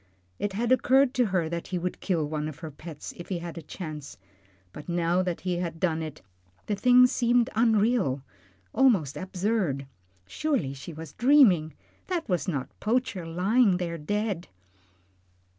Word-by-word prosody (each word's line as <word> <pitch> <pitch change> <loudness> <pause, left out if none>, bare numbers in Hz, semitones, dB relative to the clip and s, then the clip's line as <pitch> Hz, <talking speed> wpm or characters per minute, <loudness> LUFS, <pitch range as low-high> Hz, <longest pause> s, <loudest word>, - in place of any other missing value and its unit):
It 205 - -2
had 230 +4 -1
occurred 260 +1 +4
to 250 -3 +2
her 185 -4 0
that 170 +1 -4
he 185 - -2
would 180 +1 -3
kill 170 -6 0
one 150 0 -3
of 155 -2 -7
her 160 -2 -6
pets 155 +1 -9
if 175 - -9
he 185 - -1
had 170 -1 -7
a 165 - -6
chance, 155 -3 -8 0.6
but 150 - -10
now 175 +1 +1
that 180 -2 -3
he 180 -2 -1
had 170 -2 -4
done 165 -3 0
it, 155 -1 -7 0.4
the 210 - -1
thing 250 +4 +6
seemed 245 -1 +2
unreal, 220 - +2 0.5
almost 200 - +3
absurd. 185 -6 -1 0.4
Surely 165 - -1
she 140 +5 -8
was 160 -1 -9
dreaming 215 - +4 0.3
that 355 -3 -2
was 180 +1 -1
not 140 -8 -2
Poacher 215 -6 -1
lying 190 +4 +3
there 170 -2 -3
dead. 205 +2 -2
180 Hz, 160 wpm, -27 LUFS, 160-230 Hz, 0.6 s, thing